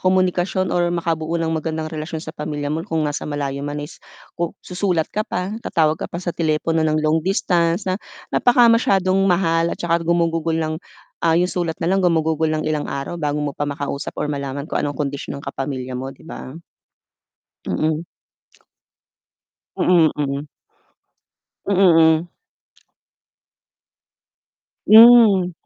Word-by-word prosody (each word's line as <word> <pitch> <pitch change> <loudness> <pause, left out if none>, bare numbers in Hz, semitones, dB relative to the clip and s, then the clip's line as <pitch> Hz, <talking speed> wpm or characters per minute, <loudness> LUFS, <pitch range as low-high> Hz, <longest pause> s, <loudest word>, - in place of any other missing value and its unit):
komunikasyon 185 0 +1
or 175 -1 +2
makabuo 165 -1 -2
ng 165 - -1
magandang 160 0 -3
relasyon 155 +1 -5
sa - - -9
pamilya 150 -1 -4
mo 160 +2 -3
kung 165 -5 -2
nasa 145 0 -3
malayo 140 -1 -3
man 145 0 -4
is, 145 - -8 0.4
ku 170 -1 -2
susulat 180 -3 -1
ka 215 - -2
pa, 180 +1 -3
tatawag 160 -4 +1
ka - - -3
pa 170 - -6
sa 175 -1 -3
telepono 160 0 0
ng 155 0 +1
long 155 +1 +2
distance 175 -2 +1
na 185 - 0 0.4
napaka 245 -1 +5
masyadong 195 -4 +2
mahal 170 -3 +2
at - - -5
saka 170 -1 0
gumugugol 165 -1 +1
ng 155 -1 -2 0.5
ah 165 0 +4
yung 180 +1 +2
sulat 170 -3 -2
na 165 - 0
lang 195 +1 +2
gumugugol 160 -2 +1
ng 155 0 -2
ilang 150 -1 -1
araw 140 +5 -4
bago 150 -1 -1
mo 145 -1 -2
pa 145 - -1
makausap 140 0 -4
or - - -1
malaman 140 -1 -4
kung - - -1
anong 145 -1 -3
kondisyon 140 -1 -4
ng - - -13
kapamilya 130 -2 -4
mo 130 +2 -5
'di 135 - -19
ba? 130 - -8 1.2
Mm. 155 +1 -1 1.7
Mm, 170 -3 +4
mm. 145 0 -2 1.2
Mm, 200 - 0 0.5
hmm. - - -15 2.6
Hmm. 220 -5 +7
165 Hz, 145 wpm, -20 LUFS, 150-180 Hz, 2.6 s, Hmm